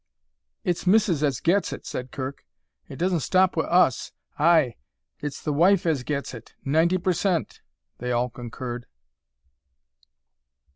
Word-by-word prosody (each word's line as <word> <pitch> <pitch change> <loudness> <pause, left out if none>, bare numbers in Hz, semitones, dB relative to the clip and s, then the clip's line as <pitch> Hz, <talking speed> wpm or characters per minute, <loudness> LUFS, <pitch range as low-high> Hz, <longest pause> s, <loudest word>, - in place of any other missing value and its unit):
"It's 175 +1 -2
Missis 190 -6 +3
as 140 -6 +1
gets 190 +4 +1
it," - - -7
said 125 0 -5
Kirk. 135 +1 -6 0.5
"It - - -8
doesn't 175 +3 0
stop 185 +5 +2
wi' 160 - +1
us." 170 -8 +2 0.3
"Ay, 155 -5 +4 0.5
it's 145 -2 -5
the 150 - -1
wife 175 +5 +4
as 155 -6 +1
gets 140 +1 -3
it, 115 -2 -11
ninety 160 +6 +3
per 185 +1 0
cent," 175 -2 -1 0.4
they 125 +1 -3
all 120 +1 0
concurred. 120 0 -7
155 Hz, 140 wpm, -25 LUFS, 130-175 Hz, 0.5 s, Ay